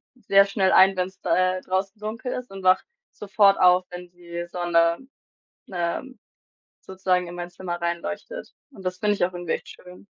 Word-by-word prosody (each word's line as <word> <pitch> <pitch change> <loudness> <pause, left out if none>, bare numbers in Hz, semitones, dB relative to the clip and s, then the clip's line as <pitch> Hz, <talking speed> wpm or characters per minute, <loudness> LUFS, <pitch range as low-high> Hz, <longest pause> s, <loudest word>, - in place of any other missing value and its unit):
sehr 200 -4 +4
schnell 195 -2 +1
ein, 190 +1 +6
wenn's 185 +1 -3
d - - -5
äh, 185 0 +2
draußen 195 +3 -3
dunkel 225 +4 -5
ist 250 -4 -6
und 195 -1 -9
wache 185 0 +4 0.3
sofort 200 -1 +3
auf, 180 0 +5
wenn 180 0 -9
die 175 -1 -7
Sonne, 170 -1 +2 0.7
ähm, 180 +9 -3 0.6
sozusagen 185 -1 -1
in 175 - -8
mein 175 0 -6
Zimmer 175 0 -5
reinleuchtet 185 - -5 0.2
und 195 -7 -13
das 180 0 -2
finde 210 -1 +2
ich 175 - +2
auch 185 - -6
irgendwie 175 -1 -3
echt - - -5
schön. 180 +2 -14
185 Hz, 175 wpm, -24 LUFS, 175-195 Hz, 0.7 s, ein